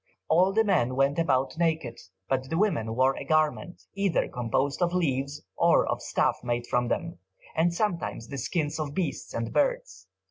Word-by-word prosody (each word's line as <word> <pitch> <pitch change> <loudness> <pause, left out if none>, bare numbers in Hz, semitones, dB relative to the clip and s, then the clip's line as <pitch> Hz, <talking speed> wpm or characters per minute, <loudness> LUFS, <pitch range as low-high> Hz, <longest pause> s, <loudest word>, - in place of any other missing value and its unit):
All 185 +4 +4
the 220 +3 +3
men 150 - +1
went 140 +3 +2
about 135 -5 +1
naked, 160 -8 0 0.3
but 130 0 -1
the 165 - -1
women 115 - 0
wore 130 +2 +3
a - - -6
garment, 155 +3 0
either 200 -3 +1
composed 130 +5 -1
of 175 0 +1
leaves 140 -4 -1
or - - +4
of - - -2
stuff - - 0
made 120 -1 -1
from 120 0 0
them, 170 +7 -3 0.4
and 165 +2 +3
sometimes 170 - -2
the 140 +1 -5
skins 155 +3 -2
of 145 -2 -4
beasts 170 -8 -3
and 115 0 -4
birds. 95 -9 -1
145 Hz, 175 wpm, -27 LUFS, 130-170 Hz, 0.4 s, All